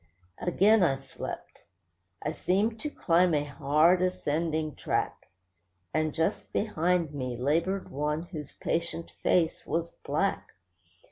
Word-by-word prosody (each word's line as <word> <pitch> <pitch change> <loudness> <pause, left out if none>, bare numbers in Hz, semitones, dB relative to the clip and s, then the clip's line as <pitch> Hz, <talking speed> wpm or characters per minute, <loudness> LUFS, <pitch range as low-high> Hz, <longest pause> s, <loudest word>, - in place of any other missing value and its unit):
Again 200 +5 +4
I 140 -7 +3
slept. 135 -1 -8 0.6
I 150 - 0
seemed 205 +7 0
to 300 - -3
climb 175 - +3
a 145 - +2
hard, 150 +5 +3
ascending 160 -3 0
track; - - -2 0.7
And 155 0 +1
just 160 +2 -1
behind 175 -5 +1
me 130 -4 -3
laboured 165 +9 0
one 150 +3 -1
whose 155 -5 -7
patient 170 0 -3
face 165 -3 +2
was 170 +1 -1
black. - - -2
165 Hz, 120 wpm, -29 LUFS, 150-180 Hz, 0.7 s, Again